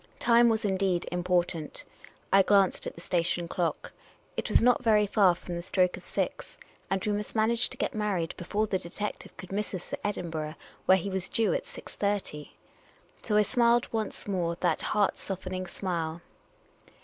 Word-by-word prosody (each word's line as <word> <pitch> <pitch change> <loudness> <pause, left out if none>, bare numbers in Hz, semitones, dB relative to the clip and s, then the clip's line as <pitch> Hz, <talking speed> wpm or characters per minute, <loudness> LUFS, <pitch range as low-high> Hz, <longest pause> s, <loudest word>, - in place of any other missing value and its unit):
Time 235 0 +5
was 220 -1 +1
indeed 190 -3 +1
im 175 0 -2
portant. 175 -3 -1 0.5
I 195 - +8
glanced 195 -1 +3
at - - -6
the 170 - -11
station 175 0 0
clock. 170 -3 -2 0.4
It - - -3
was - - +5
not 250 +1 +3
very 215 -3 +4
far 195 -3 +4
from 175 0 -7
the 170 - -3
stroke 180 0 +2
of - - -12
six, - - -3 0.3
and 195 -1 -1
we 210 - +1
must 210 +1 -3
manage 230 +2 +2
to - - -9
get - - -1
mar 210 -2 0
ried 165 -2 -2
before 205 +4 -1
the 195 -3 -1
detective 205 +5 -6
could 185 - -10
miss 205 0 -2
us 180 - -8
at - - -2
Ivdinburgh, 160 -6 -3 0.3
where 190 - +7
he 195 +2 -4
was 190 -1 -2
due 225 - +2
at - - -2
6.30. 200 - -4 0.7
So 210 -2 +1
I 210 - +6
smiled 235 +2 +2
once 220 -2 -3
more 175 -4 0
that - - +1
heart 205 -2 +1
softening 185 -1 -4
smile. 170 -3 -3
195 Hz, 185 wpm, -29 LUFS, 175-210 Hz, 0.7 s, I